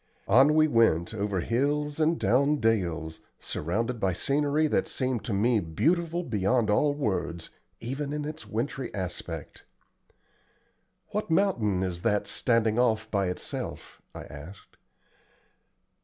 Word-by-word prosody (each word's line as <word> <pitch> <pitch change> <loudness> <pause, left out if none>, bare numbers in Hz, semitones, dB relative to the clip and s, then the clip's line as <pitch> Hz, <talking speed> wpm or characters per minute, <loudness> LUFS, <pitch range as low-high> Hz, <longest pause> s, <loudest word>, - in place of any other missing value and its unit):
On 135 +8 +5
we 155 0 +5
went, 115 - +2
over 100 -3 -1
hills 145 - 0
and 160 +1 +2
down 135 +9 +3
dales, 85 - -1 0.2
surrounded 115 +9 -2
by 95 -3 +1
scenery 145 - +1
that 155 - +1
seemed 130 -4 -2
to - - -3
me 110 +3 +2
beautiful 165 - 0
beyond 110 - +1
all 145 +7 +2
words, 90 - -2 0.3
even 135 +5 -4
in 150 0 -3
its 155 +1 -7
wintry 125 +3 -3
aspect. 85 -4 -6 1.5
"What 210 -2 -3
mountain 120 - +2
is 90 -2 -3
that 105 +2 +1
standing 115 -1 +1
off 110 -3 +1
by 100 -2 +1
itself?" 90 - -6
I - - -7
asked. 80 +7 -12
115 Hz, 125 wpm, -27 LUFS, 95-145 Hz, 1.5 s, On